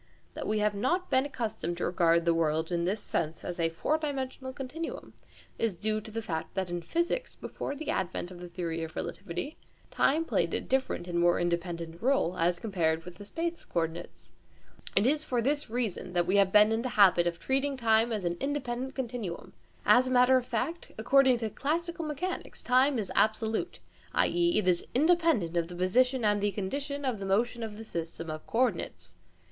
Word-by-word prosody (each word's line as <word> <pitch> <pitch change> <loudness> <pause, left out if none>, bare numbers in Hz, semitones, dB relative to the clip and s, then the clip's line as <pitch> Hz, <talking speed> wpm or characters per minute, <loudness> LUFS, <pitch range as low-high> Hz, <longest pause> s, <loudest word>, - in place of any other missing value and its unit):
That - - -5
we 215 - +1
have 210 0 +2
not 345 - 0
been 260 +2 +3
accustomed 220 - -3
to - - -1
regard 170 -1 +3
the 170 - +4
world 160 0 0
in 170 -1 0
this 200 +4 0
sense 155 +1 -2
as 175 0 -5
a 165 -1 +2
four 295 - 0
dimensional 265 -3 -4
continuum 270 +5 -6 0.5
is 225 -5 0
due 215 +4 -1
to 220 - -10
the 225 +1 -4
fact 160 -3 -4
that 190 -2 -2
in 175 0 -2
physics, 345 - -1
before 280 - -5
the 310 +1 -3
advent 185 -1 -2
of 180 - -10
the 180 - -7
theory 170 -1 -3
of 160 0 -7
relativity, 195 - -5 0.3
time 315 +4 +2
played - - 0
a - - +1
different 260 -9 -1
and 170 -1 -1
more 175 0 +4
independent 170 -1 -2
role, 260 -8 +2
as 175 +1 +2
compared 165 -6 0
with 180 -1 -10
the 205 - -10
space 335 +6 -3
coordinates. 160 - -4 0.6
It 200 - +4
is 295 +4 +2
for 250 -5 -1
this 285 +4 0
reason 220 -6 -2
that 175 -1 +2
we 190 +3 +2
have 195 -1 +4
been 210 +1 +6
in 225 +1 +1
the 255 - -2
habit 180 -4 +6
of 170 -1 -1
treating 270 +1 0
time 225 -1 +3
as 210 -4 -2
an 175 0 -1
independent 265 -2 -3
continuum. 235 -9 -5 0.3
As 255 +1 +6
a - - -2
matter 250 +1 +6
of 250 -1 +1
fact, 320 +9 -2
according 260 +3 +4
to 225 -2 -3
classical 335 - -2
mechanics, 310 +5 -4
time 255 +2 +4
is 210 -4 -3
absolute, 220 +7 +1 0.4
i.e. 345 0 +3
it 210 - +1
is 175 -1 +3
independent 315 - +3
of 170 -1 +1
the 175 - -9
position 245 +7 +2
and 205 -1 +2
the 205 0 +1
condition 280 +9 -3
of 240 -6 -1
motion 225 +5 0
of 215 -2 -5
the 225 - -8
system 165 -3 -5
of 155 0 -7
co 235 - 0
ordinates. 95 - -1
215 Hz, 195 wpm, -29 LUFS, 175-265 Hz, 0.6 s, been